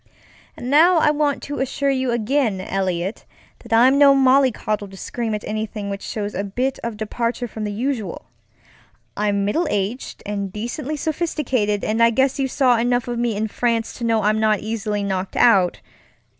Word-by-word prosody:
And 250 - -5
now 335 +5 +6
I 305 -2 +4
want 295 -1 0
to 285 - -5
assure 275 +1 0
you 260 -1 0
again, 235 -2 0
Eliot, 190 0 -2 0.4
that 235 - -15
I'm 255 +5 +5
no 280 -1 +7
mollycoddle 255 -6 +2
to 195 0 -13
scream 225 +2 -3
at 210 - -6
anything 215 -1 -4
which 200 0 -5
shows 205 -1 -4
a 195 - -2
bit 250 +7 -2
of 230 -2 -4
departure 235 +3 -2
from 220 -1 -6
the 210 - -3
usual. 235 0 -3 0.9
I'm 205 -1 0
middle 320 +12 0
aged 205 +4 -3
and 200 -2 -3
decently 240 +8 -4
sophisticated, 270 - -1
and 220 +2 0
I 230 - +7
guess 265 +4 +1
you 270 - +1
saw 255 -2 +3
enough 245 +1 +1
of 240 -1 -3
me 235 -2 0
in 215 +2 -1
France 230 +1 -1
to - - -6
know 225 -1 +1
I'm 215 +1 +2
not 215 -2 +2
easily 215 -2 -2
knocked 190 -1 -3
out. 195 -7 +4
230 Hz, 180 wpm, -21 LUFS, 210-265 Hz, 0.9 s, no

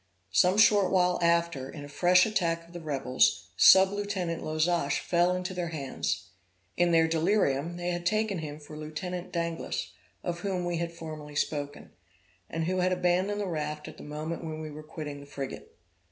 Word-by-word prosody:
Some 180 - +4
short 210 -2 +5
while 180 -1 +3
after, 170 -5 +1
in 145 -1 -8
a - - -9
fresh 180 +5 +4
attack 170 -6 0
of 170 - -18
the 175 - -6
rebels, 130 - +1
sub 190 0 +8
lieutenant 195 -5 -2
Lozach 155 -1 +1
fell 175 +1 +2
into 180 +1 -3
their 175 -1 -2
hands. 145 -5 -3 0.5
In 175 0 +3
their 165 -1 +5
delirium, 165 -2 +1
they 175 0 -2
had 175 0 -3
taken 215 +1 0
him 150 -2 -6
for 150 0 -11
Lieutenant 170 +4 -5
Danglas, 170 -1 -3 0.3
of 175 -1 -3
whom 185 -1 -2
we 175 -1 -1
have 170 0 -2
formerly 155 -3 -8
spoken, 145 -1 -3 0.6
and 165 0 -2
who 185 +3 0
had 185 0 +2
abandoned 185 +3 +1
the - - -1
raft 150 -3 -3
at - - -10
the - - -10
moment 155 +3 -5
when 155 -1 -5
we 155 -1 -6
were 150 +1 -8
quitting 150 -2 -7
the 140 - -12
frigate. 140 -2 -7
170 Hz, 180 wpm, -29 LUFS, 150-180 Hz, 0.6 s, sub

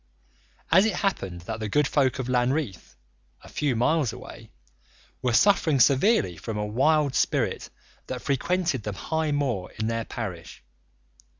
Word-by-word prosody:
And 185 +4 +7
it 210 - -1
happened 95 - -2
that 90 - -6
the 110 -1 -3
good 145 +5 +2
folk 135 -5 +1
of 130 -2 -4
Lanreath, 125 - -1 0.5
a - - -13
few 145 -4 -1
miles 130 +2 +1
away, - - -11 0.7
were 125 - 0
suffering 160 - +3
severely 135 - +3
from 110 +5 -5
a 105 - -1
wild 140 +6 +2
spirit - - 0 0.4
that 130 -1 -5
frequented 160 0 0
the 105 0 -4
high 160 +8 -2
moor 130 -11 -1
in 110 - -2
their 115 0 -2
parish. 90 - -7
130 Hz, 145 wpm, -26 LUFS, 110-155 Hz, 0.7 s, And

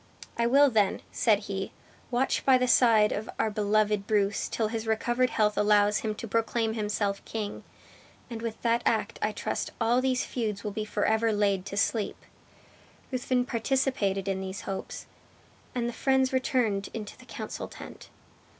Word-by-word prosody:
"I 235 0 +1
will 280 +2 +5
then," 210 -4 +1
said 215 -2 +2
he, 195 -2 -4 0.4
"watch 255 +2 0
by 265 -1 +6
the 250 0 +1
side 225 -4 +5
of 215 +1 -3
our 220 - +1
beloved 210 0 +1
Bruce 205 -1 +1
till 220 -2 -1
his 225 0 -4
recovered 240 +3 +1
health 210 -1 +1
allows 210 0 +4
him 215 -1 -3
to 230 - -7
proclaim 225 +1 0
himself 205 -2 -1
king; 210 -2 -5 0.6
and 230 -2 -6
with 230 -1 -4
that 235 0 +2
act 225 - 0
I 210 - +1
trust 210 - -3
all 235 +2 +3
these 255 -1 +1
feuds 215 -5 -3
will 210 - -3
be 215 +1 -3
forever 220 +2 +1
laid 200 -2 +1
to 200 - -5
sleep!" 210 +1 0 0.9
Ruthven 255 -1 0
participated 230 -6 0
in 190 -1 -1
these 190 +3 -5
hopes, 195 -1 -6 0.7
and 240 -1 0
the 240 - -3
friends 265 +2 +2
returned 240 -6 +1
into 210 -2 -6
the - - -17
council - - -6
tent. - - -11
220 Hz, 165 wpm, -28 LUFS, 205-240 Hz, 0.9 s, by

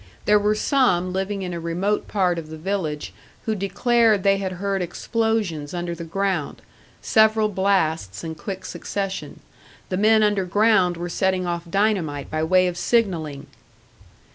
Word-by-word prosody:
There 210 0 +5
were 210 +1 +1
some 200 - +2
living 195 +1 -2
in 180 -1 -4
a 170 - -4
remote 180 +5 -1
part 180 -4 +1
of 155 -2 -9
the 160 - -7
village 160 -4 -3 0.3
who 220 - 0
declared 215 +1 +2
they 195 0 +4
had 190 -1 -3
heard 195 +1 -2
explosions 180 -5 -2
under 175 0 -3
the 170 - -7
ground, 180 -2 -2 0.4
several 220 0 +4
blasts 165 - 0
in 165 -1 -4
quick 190 +5 -7
succession. 195 -1 -5 0.5
The 185 - -1
men 215 +2 +4
underground 200 -2 +2
were 175 +1 -4
setting 185 +1 0
off 170 -1 -4
dynamite 180 -8 0
by 155 0 -1
way 185 +3 +4
of 180 -1 -2
signalling! 165 -12 0
190 Hz, 150 wpm, -23 LUFS, 170-205 Hz, 0.5 s, There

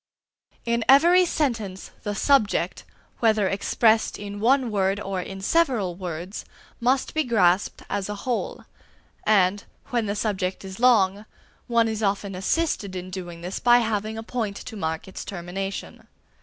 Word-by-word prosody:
In 235 0 +1
every 345 +7 +7
sentence 225 - -2
the 205 -1 -3
subject, 265 -2 +2 0.3
whether 215 -4 +3
expressed 220 +3 +2
in 205 0 -7
one 250 +2 +3
word 195 -1 +1
or 195 -3 -3
in 195 +1 -7
several 240 - +1
words, 175 +1 -6 0.4
must 255 +3 +1
be 315 - +1
grasped 200 -7 +2
as 200 -1 -3
a 210 - -3
whole; 245 -3 -2 0.6
and, 200 -1 +3 0.3
when 235 -3 0
the 205 - -1
subject 195 -3 -2
is 190 +1 -8
long, 210 -4 +3 0.4
one 235 -1 +3
is 220 -1 -3
often 200 -1 -1
assisted 200 - -1
in 185 0 -6
doing 175 -2 -7
this 180 +3 -4
by 240 0 +6
having 220 -2 -1
a 225 - -5
point 220 -4 -3
to 225 - -8
mark 160 -4 -3
its 190 - -7
termination. 195 +1 -6
205 Hz, 150 wpm, -24 LUFS, 190-235 Hz, 0.6 s, every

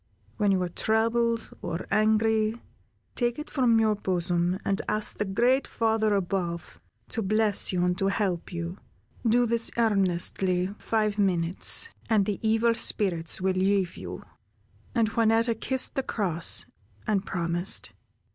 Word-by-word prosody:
When 205 -2 +2
you 190 - +2
are 180 - -3
troubled 230 +4 0
or 170 -1 -4
angry, 220 +1 +2 0.5
take 240 -1 -1
it 300 - -7
from 240 -5 +3
your 220 -1 +3
bosom, 180 -2 -1
and 195 0 0
ask 215 0 -2
the 210 - 0
great 240 +7 +2
Father 220 -2 +1
above 175 - -3 0.3
to 230 - -2
bless 215 0 +2
you 180 -1 +1
and 180 +1 0
help 195 -3 -1
you. 170 +2 -5 0.5
Do 240 +2 +4
this 230 0 +2
earnestly 190 -3 +1
five 215 -2 0
minutes, 185 - +2 0.2
and 215 -3 +3
the 205 -2 -2
evil 225 +1 +2
spirits 180 -7 0
will 190 0 +1
leave 190 -1 +1
you." - - -8 0.7
And 225 -2 +2
Juanetta 230 +1 +2
kissed 260 +3 -1
the 270 - 0
cross 180 -10 -1 0.4
and 200 -3 0
promised. 175 0 -1
205 Hz, 135 wpm, -27 LUFS, 185-225 Hz, 0.7 s, Do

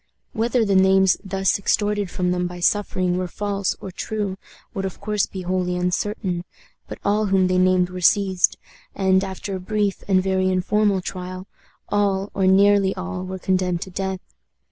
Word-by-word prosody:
Whether 230 +1 +1
the 200 - +1
names 190 0 +5
thus 195 0 0
extorted 205 0 0
from 180 0 -1
them 180 0 0
by 175 0 -8
suffering 185 -1 +1
were 185 - -2
false 200 +1 -2
or 190 - -7
true 205 0 -3 0.4
would 195 - -3
of 190 -2 -5
course 210 0 0
be 190 -1 -7
wholly 180 0 -1
uncertain, 180 0 -2 0.4
but - - -7
all 210 +1 +2
whom 190 -1 +3
they 185 0 +2
named 185 -1 +3
were 180 0 -6
seized, 190 0 +3 0.4
and, 190 -1 +2
after 190 +1 -5
a - - -4
brief 205 +1 -1
and 185 -2 +3
very 190 -1 +1
informal 195 +2 +1
trial, 185 0 -6 0.4
all, 200 -1 0
or 190 -1 +1
nearly 195 0 +4
all, 185 0 -5
were 185 0 -5
condemned 185 -2 0
to 190 - -11
death. 190 0 -3
190 Hz, 170 wpm, -22 LUFS, 185-200 Hz, 0.4 s, names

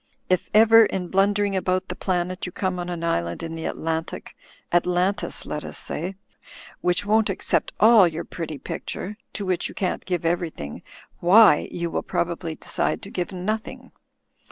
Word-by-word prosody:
If 185 - +1
ever, 225 +1 +7
in 180 -2 -4
blundering 200 +1 +2
about 185 0 0
the - - -5
planet, 180 0 -2
you - - -6
come 185 0 -2
on 175 0 -4
an 170 -1 -4
island 85 - -1
in 165 0 -5
the 165 0 -5
Atlantic 160 0 -4 0.2
— - - -23
^Atlantis, 180 +3 +1
let 150 - -4
us - - -7
say 180 +5 -4 0.3
— - - -17
^which 180 +3 +1
won't 220 +1 +3
accept 195 - 0
all 220 -3 +7
your 165 0 -4
pretty 160 -3 -6
picture 195 +8 -5
— - - -51
^to 205 - -2
which 185 -2 0
you - - -11
can't 185 -3 -2
give 175 -3 -2
everything 165 - -2 0.2
— - - -28
why 190 -1 +6
you 170 -1 -3
will - - -1
prob 170 - -1
ably 170 -2 -5
decide - - -2
to - - -9
give 180 0 -3
nothing. 210 +4 -4
180 Hz, 185 wpm, -24 LUFS, 170-195 Hz, 0.3 s, ever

